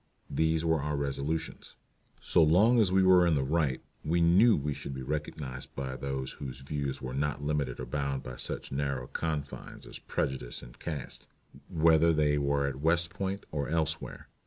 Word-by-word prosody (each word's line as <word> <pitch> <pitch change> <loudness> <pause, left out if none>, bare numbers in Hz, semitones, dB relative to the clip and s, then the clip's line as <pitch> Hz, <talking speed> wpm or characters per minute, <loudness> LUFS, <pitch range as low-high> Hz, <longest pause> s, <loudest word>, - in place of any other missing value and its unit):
These 80 0 +1
were 80 -2 +2
our 75 0 -1
resolutions. 70 +3 -3 0.5
So - - +3
long 100 +10 +5
as 100 -5 +4
we 95 0 +4
were 90 -1 +6
in 85 - +3
the 70 - +1
right 70 -2 0 0.2
we 85 +3 +1
knew 95 +8 +6
we 75 0 -1
should 70 0 -6
be 65 - -5
recognized 70 -2 -5
by 65 -1 -4
those 65 -1 -3
whose 65 -1 -7
views 70 -1 -3
were 65 0 -4
not 70 +1 -1
limited 70 -4 -1
or - - -4
bound 70 -2 -2
by 65 -1 -7
such - - -4
narrow 70 -2 -1
confines 75 -1 -4
as - - -7
prejudice 65 -2 -3
and - - -13
caste, 75 -6 -6 0.4
whether 80 0 +4
they 75 -1 +2
were 70 0 +1
at 70 0 -3
West 85 +1 +2
Point 95 +2 -3
or 70 -2 -2
elsewhere. 80 -1 -2
75 Hz, 180 wpm, -30 LUFS, 70-80 Hz, 0.5 s, were